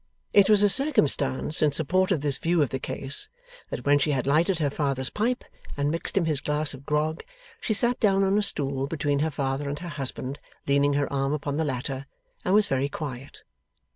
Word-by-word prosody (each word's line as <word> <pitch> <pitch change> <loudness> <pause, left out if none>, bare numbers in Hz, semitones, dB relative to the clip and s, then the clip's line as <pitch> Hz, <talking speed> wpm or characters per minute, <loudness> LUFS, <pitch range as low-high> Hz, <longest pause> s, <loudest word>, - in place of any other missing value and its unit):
It 200 0 +6
was 210 -1 +6
a - - +6
circumstance 150 - +2
in 150 - +4
support 175 +6 +1
of 170 -7 +1
this 145 -2 -1
view 170 -1 +2
of 140 - -3
the 130 - -2
case, 135 +1 -2 0.4
that - - -6
when 145 0 +4
she 145 - +1
had 130 -2 -1
lighted 160 +6 +2
her 150 -4 0
father's 135 -3 -2
pipe, 240 +4 -1 0.3
and 145 +1 0
mixed 165 +4 -2
him 180 - +3
his 150 -4 -1
glass 150 0 0
of 135 +1 -12
grog, 155 +2 -1 0.4
she 220 - -1
sat 240 +3 +1
down 195 -2 +3
on 195 +1 +2
a 210 - +3
stool 135 -8 +1
between 145 -2 -1
her 155 +2 +1
father 140 0 -2
and 145 - -3
her 175 +3 -7
husband, 135 -1 -5 0.3
leaning 140 +1 +2
her 140 0 -1
arm 135 +1 0
upon 145 -1 -3
the 160 - 0
latter, 135 0 -4 0.4
and 185 - +2
was 210 0 +5
very 135 +1 -1
quiet. 135 -3 -7
145 Hz, 210 wpm, -26 LUFS, 140-175 Hz, 0.4 s, It